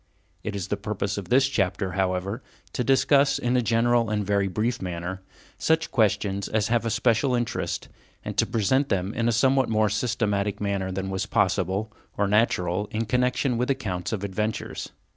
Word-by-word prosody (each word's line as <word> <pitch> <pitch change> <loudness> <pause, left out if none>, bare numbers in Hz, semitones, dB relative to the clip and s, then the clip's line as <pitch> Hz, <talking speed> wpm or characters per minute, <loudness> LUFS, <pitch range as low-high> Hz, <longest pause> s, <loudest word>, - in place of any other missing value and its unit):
It 105 - -4
is 100 -1 -4
the 105 - 0
purpose 100 -1 -3
of 95 -3 -9
this 135 +2 +4
chapter, 95 -6 -1
however, 95 +4 -1 0.3
to 125 - -1
discuss, 135 +2 +4
in 120 +1 0
a 125 - +4
general 115 0 +2
and 105 -1 -1
very 100 0 +1
brief 110 +6 -1
manner, 90 +1 -4 0.4
such 160 0 +1
questions 100 -5 +1
as 110 -1 0
have 115 0 +1
a - - +1
special 120 +3 +2
interest, 120 -2 -2 0.4
and - - -4
to - - +3
present 130 +6 +1
them 95 +2 -1
in 115 -1 0
a - - +3
somewhat 130 +3 +3
more 110 -1 +2
systematic 105 -2 -1
manner 100 -2 -1
than 95 +1 -3
was 95 -1 -2
possible, 95 +3 0 0.2
or 100 - +2
natural, 105 -2 +1
in 110 +1 -2
connection 125 +1 +1
with 125 - 0
accounts 95 -10 -2
of 105 -3 -3
adventures. 105 +2 -3
105 Hz, 180 wpm, -25 LUFS, 95-120 Hz, 0.4 s, this